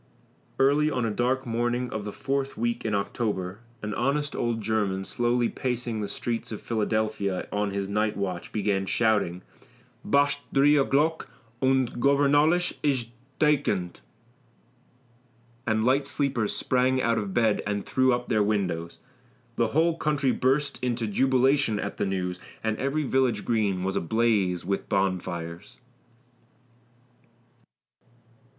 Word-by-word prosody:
"Early 145 Hz, +3 st, +3 dB
on 125 Hz, -5 st, -1 dB
a 110 Hz, -, 0 dB
dark 125 Hz, +4 st, 0 dB
morning 120 Hz, +1 st, -1 dB
of 110 Hz, -1 st, -4 dB
the 105 Hz, -, -4 dB
fourth 135 Hz, +3 st, -2 dB
week 120 Hz, +1 st, -1 dB
in 105 Hz, -2 st, 0 dB
October, 100 Hz, -2 st, -2 dB, 0.2 s
an 105 Hz, 0 st, -3 dB
honest 145 Hz, +5 st, 0 dB
old 115 Hz, -1 st, -1 dB
German, 100 Hz, -3 st, -1 dB
slowly 120 Hz, +1 st, +1 dB
pacing 120 Hz, -4 st, -3 dB
the 105 Hz, -, -2 dB
streets 115 Hz, +4 st, -4 dB
of 110 Hz, -, -5 dB
Philadelphia 110 Hz, -4 st, -1 dB
on 105 Hz, 0 st, 0 dB
his 100 Hz, 0 st, -3 dB
night 105 Hz, +1 st, 0 dB
watch, 95 Hz, -3 st, -3 dB
began 100 Hz, -2 st, 0 dB
shouting, 100 Hz, -6 st, +1 dB, 0.6 s
'Basht 145 Hz, 0 st, +2 dB
dree 145 Hz, +2 st, +5 dB
o'glock, 150 Hz, +3 st, +2 dB, 0.3 s
und 130 Hz, -2 st, +1 dB
Gornvallis 145 Hz, +5 st, +3 dB
ish 130 Hz, -5 st, 0 dB, 0.3 s
dakendt!' 135 Hz, -, +1 dB, 1.7 s
and 110 Hz, 0 st, +1 dB
light 135 Hz, +2 st, +2 dB
sleepers 135 Hz, -7 st, 0 dB
sprang 130 Hz, 0 st, +2 dB
out 115 Hz, -2 st, +1 dB
of 100 Hz, -2 st, -4 dB
bed 110 Hz, -1 st, +2 dB
and 100 Hz, -1 st, -2 dB
threw 130 Hz, 0 st, +2 dB
up 120 Hz, 0 st, -1 dB
their 110 Hz, -3 st, +2 dB
windows." 95 Hz, -5 st, -1 dB, 0.6 s
The -, -, +2 dB
whole 165 Hz, +2 st, +2 dB
country 145 Hz, -4 st, +1 dB
burst 135 Hz, +2 st, 0 dB
into 120 Hz, -2 st, 0 dB
jubilation 130 Hz, +1 st, +2 dB
at -, -, -4 dB
the -, -, 0 dB
news, 90 Hz, -2 st, -2 dB, 0.2 s
and 110 Hz, -1 st, 0 dB
every 140 Hz, +3 st, -1 dB
village 130 Hz, -3 st, +1 dB
green 100 Hz, -5 st, 0 dB
was 95 Hz, +1 st, -1 dB
ablaze 100 Hz, -3 st, +1 dB
with 100 Hz, +1 st, -2 dB
bonfires. 90 Hz, -1 st, -2 dB
115 Hz, 130 wpm, -26 LUFS, 100-135 Hz, 1.7 s, dree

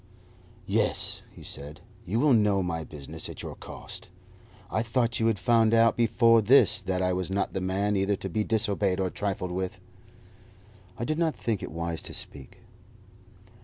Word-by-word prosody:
"Yes," -, -, 0 dB
he -, -, -14 dB
said; 75 Hz, +2 st, -6 dB, 0.3 s
"you 105 Hz, +6 st, -1 dB
will 145 Hz, 0 st, +4 dB
know 105 Hz, -4 st, +3 dB
my 85 Hz, -2 st, -3 dB
business 75 Hz, +1 st, -8 dB
at -, -, -8 dB
your -, -, -6 dB
cost. -, -, -9 dB, 0.6 s
I 110 Hz, -, +1 dB
thought 115 Hz, 0 st, 0 dB
you 115 Hz, -, +2 dB
had 115 Hz, -2 st, +2 dB
found 115 Hz, +4 st, +3 dB
out 115 Hz, 0 st, +5 dB
before 115 Hz, 0 st, +4 dB
this 115 Hz, -1 st, +5 dB
that 95 Hz, 0 st, -1 dB
I 90 Hz, 0 st, +1 dB
was 90 Hz, -1 st, -2 dB
not 100 Hz, +1 st, -1 dB
the 95 Hz, -, -2 dB
man 100 Hz, +3 st, 0 dB
either 100 Hz, +1 st, +1 dB
to 95 Hz, -, -6 dB
be 100 Hz, +4 st, -1 dB
disobeyed 100 Hz, -4 st, +1 dB
or 95 Hz, -1 st, 0 dB
trifled 100 Hz, -2 st, -3 dB
with." 95 Hz, +1 st, -3 dB, 1.2 s
I 120 Hz, -, -3 dB
did 155 Hz, +3 st, -1 dB
not 165 Hz, -2 st, +1 dB
think 110 Hz, -4 st, -2 dB
it -, -, -5 dB
wise 85 Hz, 0 st, -3 dB
to -, -, -5 dB
speak. 65 Hz, -2 st, -3 dB
100 Hz, 175 wpm, -27 LUFS, 90-115 Hz, 1.2 s, out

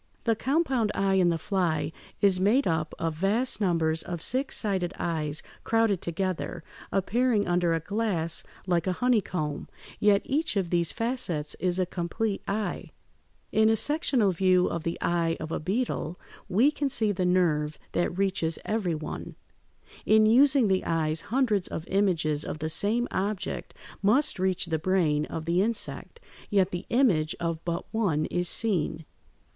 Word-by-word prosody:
The 225 Hz, -1 st, +2 dB
compound 265 Hz, -4 st, +1 dB
eye 195 Hz, 0 st, +1 dB
in 185 Hz, -2 st, +4 dB
the 170 Hz, -, +1 dB
fly 160 Hz, -4 st, -1 dB, 0.3 s
is 195 Hz, -2 st, +4 dB
made 220 Hz, +9 st, +3 dB
up 160 Hz, -2 st, -1 dB
of 165 Hz, -1 st, -2 dB
vast 210 Hz, +9 st, 0 dB
numbers 165 Hz, -4 st, +1 dB
of 175 Hz, -1 st, -5 dB
six 260 Hz, -, +1 dB
sided 190 Hz, -4 st, -1 dB
eyes 155 Hz, -3 st, -1 dB, 0.2 s
crowded 225 Hz, -5 st, +2 dB
together, 175 Hz, -1 st, -3 dB, 0.3 s
appearing 215 Hz, +2 st, +1 dB
under 175 Hz, -1 st, +2 dB
a 165 Hz, -, +1 dB
glass 180 Hz, -3 st, 0 dB, 0.2 s
like 175 Hz, -1 st, 0 dB
a 185 Hz, -, +1 dB
honeycomb; 180 Hz, -10 st, -1 dB, 0.3 s
yet 205 Hz, -1 st, +4 dB
each 305 Hz, +1 st, 0 dB
of 185 Hz, -4 st, -1 dB
these 170 Hz, -1 st, +2 dB
facets 225 Hz, -, -2 dB
is 180 Hz, -1 st, 0 dB
a 185 Hz, -, +2 dB
complete 190 Hz, +4 st, -2 dB
eye. 210 Hz, +1 st, -3 dB, 0.6 s
In 220 Hz, 0 st, +4 dB
a 225 Hz, -, +4 dB
sectional 260 Hz, -5 st, +2 dB
view 185 Hz, 0 st, +3 dB
of 170 Hz, -, -2 dB
the 165 Hz, +1 st, -3 dB
eye 170 Hz, -1 st, +1 dB
of 155 Hz, -, -6 dB
a -, -, -1 dB
beetle 185 Hz, -2 st, -2 dB, 0.3 s
(Fig. -, -, -35 dB
157) 185 Hz, -, -3 dB
we 270 Hz, +7 st, +5 dB
can 290 Hz, -2 st, -2 dB
see 220 Hz, -5 st, 0 dB
the 185 Hz, -2 st, -2 dB
nerve 155 Hz, -4 st, +1 dB
that 175 Hz, +1 st, -1 dB
reaches 185 Hz, -4 st, 0 dB
every 205 Hz, -6 st, -1 dB
one. 155 Hz, 0 st, -6 dB, 0.7 s
In 215 Hz, 0 st, +6 dB
using 265 Hz, +2 st, +5 dB
the 190 Hz, -1 st, +1 dB
eyes 160 Hz, -1 st, 0 dB
hundreds 225 Hz, -6 st, +1 dB
of 160 Hz, -, -6 dB
images 165 Hz, -7 st, +1 dB
of -, -, -5 dB
the 155 Hz, +1 st, -3 dB
same 225 Hz, +8 st, +1 dB
object 195 Hz, 0 st, -3 dB, 0.3 s
must 230 Hz, +4 st, +2 dB
reach 185 Hz, -1 st, +1 dB
the 160 Hz, -2 st, -1 dB
brain 155 Hz, -4 st, +1 dB
of 160 Hz, -, -5 dB
the 170 Hz, +2 st, +2 dB
insect, 230 Hz, -, -3 dB, 0.3 s
yet 195 Hz, -3 st, +2 dB
the 175 Hz, 0 st, -5 dB
image 190 Hz, -, +2 dB
of 165 Hz, -1 st, -3 dB
but 170 Hz, 0 st, -3 dB
one 175 Hz, -9 st, +1 dB
is 175 Hz, -1 st, 0 dB
seen. 165 Hz, -7 st, 0 dB
185 Hz, 165 wpm, -27 LUFS, 165-220 Hz, 0.7 s, In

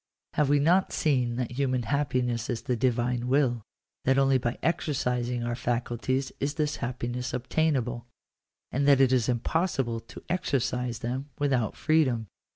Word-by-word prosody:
Have 150 Hz, -2 st, +2 dB
we 145 Hz, -, +5 dB
not 175 Hz, +6 st, +3 dB
seen 125 Hz, -6 st, +1 dB
that 125 Hz, -1 st, -2 dB
human 130 Hz, -1 st, 0 dB
happiness 125 Hz, -4 st, 0 dB
is 120 Hz, -3 st, -2 dB
the 125 Hz, -, 0 dB
Divine 120 Hz, 0 st, 0 dB
will 125 Hz, -3 st, +2 dB, 0.2 s
— -, -, -46 dB
that 135 Hz, +1 st, +3 dB
only 135 Hz, -1 st, +4 dB
by 120 Hz, 0 st, -2 dB
exer 160 Hz, -2 st, 0 dB
cising 125 Hz, -1 st, -1 dB
our 120 Hz, -, -1 dB
faculties 120 Hz, +2 st, -1 dB
is 145 Hz, +2 st, -1 dB
this 150 Hz, -2 st, -1 dB
happiness 125 Hz, +1 st, -3 dB
obtainable 125 Hz, -3 st, 0 dB, 0.3 s
— -, -, -61 dB
and 140 Hz, +2 st, +1 dB
that 140 Hz, -2 st, +6 dB
it 130 Hz, -1 st, +5 dB
is 125 Hz, -2 st, +2 dB
impossible 125 Hz, -1 st, 0 dB
to 115 Hz, -, -12 dB
exercise 125 Hz, -8 st, -1 dB
them 130 Hz, +4 st, -3 dB
without 135 Hz, -7 st, 0 dB
freedom 140 Hz, -8 st, +2 dB
125 Hz, 160 wpm, -28 LUFS, 120-140 Hz, 0.3 s, that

